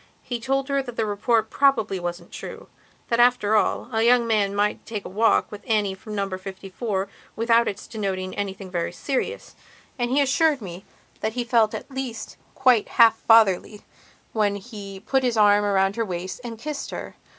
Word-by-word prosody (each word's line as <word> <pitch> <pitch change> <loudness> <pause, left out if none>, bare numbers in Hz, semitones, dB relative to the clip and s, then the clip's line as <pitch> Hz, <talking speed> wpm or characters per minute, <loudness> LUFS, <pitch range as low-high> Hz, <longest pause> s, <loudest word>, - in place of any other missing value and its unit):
He 245 -2 -4
told 270 +3 -1
her 275 -1 +1
that 245 -3 -8
the 225 - 0
report 220 +2 0
probably 225 -9 +2
wasn't 175 0 -5
true; - - -9 0.4
that, 235 - +1
after 240 -3 +4
all, 210 - +1
a 225 - +1
young 240 +1 +4
man 205 -3 +1
might 205 +1 0
take 215 -3 -6
a - - -6
walk 220 +4 +2
with 210 -1 -8
Annie 210 -3 +1
from 210 +3 -8
Number 195 -2 -2
54 195 +1 -4 0.3
without 230 +1 +3
its 200 - -4
denoting 190 -4 -3
anything 195 -1 -5
very 170 -2 -2
serious. 285 - -3 0.5
And 240 0 0
he 270 +3 +2
assured 285 +2 +3
me 185 -3 -9 0.3
that 220 0 -2
he 245 0 -2
felt 230 -3 +2
at - - -8
least 260 -4 -5 0.2
quite 255 -5 +3
half 230 -2 +7
fatherly 215 -2 +4 0.5
when 210 -2 +1
he 200 -2 -9
put 265 +5 +1
his 245 -3 0
arm 205 -1 +5
around 195 0 +1
her 230 - +1
waist 185 +3 -5
and 230 -2 -6
kissed 290 +4 -5
her. - - -7
220 Hz, 185 wpm, -24 LUFS, 195-240 Hz, 0.5 s, half